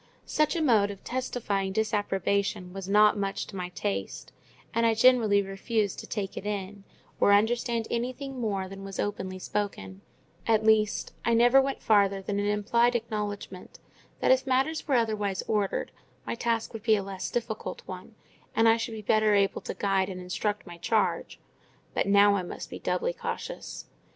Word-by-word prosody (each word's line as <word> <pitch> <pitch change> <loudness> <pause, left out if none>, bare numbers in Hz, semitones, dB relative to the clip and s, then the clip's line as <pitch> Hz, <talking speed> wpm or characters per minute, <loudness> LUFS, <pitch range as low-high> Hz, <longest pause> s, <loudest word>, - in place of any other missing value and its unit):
Such 305 +3 +1
a 330 - 0
mode 215 -7 +4
of 200 -1 -9
testifying 210 -6 -2
disapprobation 200 -3 0
was 195 -1 -6
not 210 +1 +5
much 195 -1 -2
to 200 - -11
my 180 -1 -4
taste; 100 - -4 0.4
and 230 - +1
I 225 -1 +3
generally 225 -4 +5
refused 200 +1 -2
to - - -8
take 200 -3 -4
it - - -5
in, 200 -1 -4 0.4
or - - +5
understand 230 +2 +2
anything 255 +3 -3
more 200 -4 -1
than 195 +1 -9
was 195 -1 -7
openly 190 -2 -3
spoken; 180 - -4 0.5
at 220 -1 +3
least, 215 -1 +2
I 235 - +2
never 245 +3 +6
went 275 0 -3
farther 200 -2 +3
than 200 +1 -3
an 205 - 0
implied 235 +4 +2
acknowledgment 210 -5 -4 0.4
that, - - +4
if 260 +1 +3
matters 270 +6 +1
were 275 - +2
otherwise 215 -5 0
ordered 210 -3 0 0.3
my - - -2
task 230 -1 -1
would 225 - -6
be 220 0 +4
a 200 - -2
less 190 -1 -5
difficult 230 -2 -4
one, - - -9 0.4
and 225 0 +4
I 225 0 +6
should 230 0 -4
be 215 - -7
better 215 0 +3
able 200 -1 +2
to - - -6
guide 195 -1 +1
and 185 -1 -6
instruct 205 +3 -3
my 175 -2 -11
charge; 215 +5 0 0.5
but - - 0
now 200 0 +6
I - - -1
must 175 - -7
be - - -6
doubly - - -1
cautious. - - -6
210 Hz, 175 wpm, -28 LUFS, 195-230 Hz, 0.5 s, never